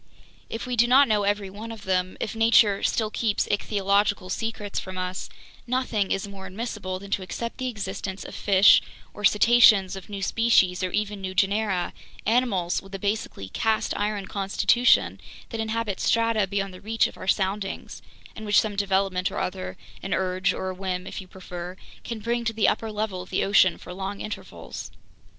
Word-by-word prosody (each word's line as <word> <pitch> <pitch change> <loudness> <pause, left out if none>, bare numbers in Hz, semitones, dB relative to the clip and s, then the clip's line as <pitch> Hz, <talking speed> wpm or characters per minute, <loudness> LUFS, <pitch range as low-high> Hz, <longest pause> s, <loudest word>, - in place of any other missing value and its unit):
"If 225 - -4
we 250 -1 -2
do 240 +1 +4
not 270 +3 +6
know 210 -2 +2
every 200 -1 0
one 220 +3 -7
of 220 -3 -9
them, 185 -1 0
if 225 - -3
nature 225 -3 +5
still 220 -3 0
keeps 215 -3 0
ichthyological 200 -2 +1
secrets 215 -1 -3
from 185 0 -7
us, 185 0 -4 0.4
nothing 235 -5 0
is 195 +1 -1
more 195 -1 -9
admissible 195 -2 -4
than 200 +1 -11
to 195 - 0
accept 230 +6 -5
the 255 - -2
existence 195 -3 -5
of - - -8
fish 195 0 +6 0.3
or 210 - -10
cetaceans 210 -3 +6
of 195 0 -10
new 200 -1 -5
species 195 -5 +3
or 185 - 0
even 210 +1 -2
new 185 0 -5
genera, 195 -2 +1 0.3
animals 210 -7 +1
with 195 0 -10
a - - -2
basically 200 - -3
'cast 220 - 0
iron' 205 -1 -1
constitution 200 +5 +2 0.3
that 225 -2 -3
inhabit 220 -3 -2
strata 230 -3 +2
beyond 195 0 -2
the 185 - -11
reach 225 +2 +1
of - - -4
our - - -9
soundings, 195 0 -1 0.3
and 220 - -8
which 205 - +6
some 215 -2 -1
development 195 -2 +1
or - - -7
other, 95 - -3 0.2
an 195 - -1
urge 185 0 +1
or 190 - -3
a - - -6
whim 185 -1 -3
if - - -6
you 185 - -13
prefer, 180 -1 -8 0.3
can 230 - -5
bring 235 +2 -1
to 235 -1 -1
the 220 -1 +2
upper 225 -1 0
level 210 -3 -3
of 185 - -11
the 190 - 0
ocean 195 -2 +4
for 180 - -9
long 195 +2 -5
intervals. 215 - -7
200 Hz, 185 wpm, -25 LUFS, 190-220 Hz, 0.4 s, not